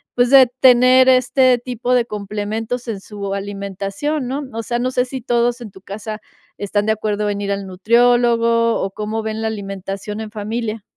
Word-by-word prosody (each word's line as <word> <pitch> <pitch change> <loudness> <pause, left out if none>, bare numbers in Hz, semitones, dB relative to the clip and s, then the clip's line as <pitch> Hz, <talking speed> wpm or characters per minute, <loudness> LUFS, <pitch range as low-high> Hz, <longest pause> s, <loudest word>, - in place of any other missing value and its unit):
pues, 245 0 +3
de 270 -2 +8
tener 255 0 +6
este 255 0 +4
tipo 245 0 -2
de 245 - +3
complementos 215 +3 -4
en 210 -3 -3
su 200 0 -6
alimentación, 200 +8 -4
¿no? 275 +3 -3
O 230 - -3
sea, 240 +1 -2
no 255 +1 -1
sé 250 -1 +1
si 260 0 -6
todos 240 0 0
en 220 -4 -8
tu 190 - -14
casa 215 +2 -7 0.4
están 205 0 -1
de 220 - +2
acuerdo 210 -1 -1
en 200 0 -2
ir 200 0 -1
al 200 0 -4
nutriólogo, 230 +3 +2
o 190 - -2
cómo 215 +2 -4
ven 220 0 -4
la 225 - -1
alimentación 195 0 -5
en 220 -1 -6
familia. 215 0 -4
220 Hz, 185 wpm, -19 LUFS, 205-245 Hz, 0.4 s, de